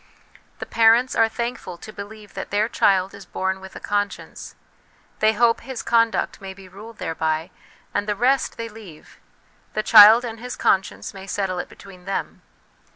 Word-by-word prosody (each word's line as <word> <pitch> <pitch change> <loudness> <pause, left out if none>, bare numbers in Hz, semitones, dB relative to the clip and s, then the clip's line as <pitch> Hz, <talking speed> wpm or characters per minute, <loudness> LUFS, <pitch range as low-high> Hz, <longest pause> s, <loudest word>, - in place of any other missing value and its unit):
The - - -6
parents 230 +3 +4
are 225 0 +4
thankful 235 -6 -5
to 215 - -11
believe 210 0 -10
that - - -6
their 205 +2 +1
child 190 -4 +2
is 200 -1 -12
born 190 0 -2
with 190 0 -12
a - - -7
conscience; 205 0 -4 0.6
they 215 0 +4
hope 230 +1 +2
his 260 -3 -6
conduct 230 -5 +1
may 190 -1 -8
be 195 -1 -14
ruled 215 +5 -12
thereby: 160 +1 -2 0.4
and 205 +1 -1
the 210 - 0
rest 255 +6 +1
they 230 - -4
leave; 210 -8 -14 0.5
the 215 - -1
child 220 +3 +8
and 225 -1 -6
his 250 +2 -6
conscience 190 +1 0
may 195 0 -10
settle 195 -3 -2
it - - -5
between 185 -2 -15
them. 195 0 -4
205 Hz, 170 wpm, -22 LUFS, 190-230 Hz, 0.6 s, child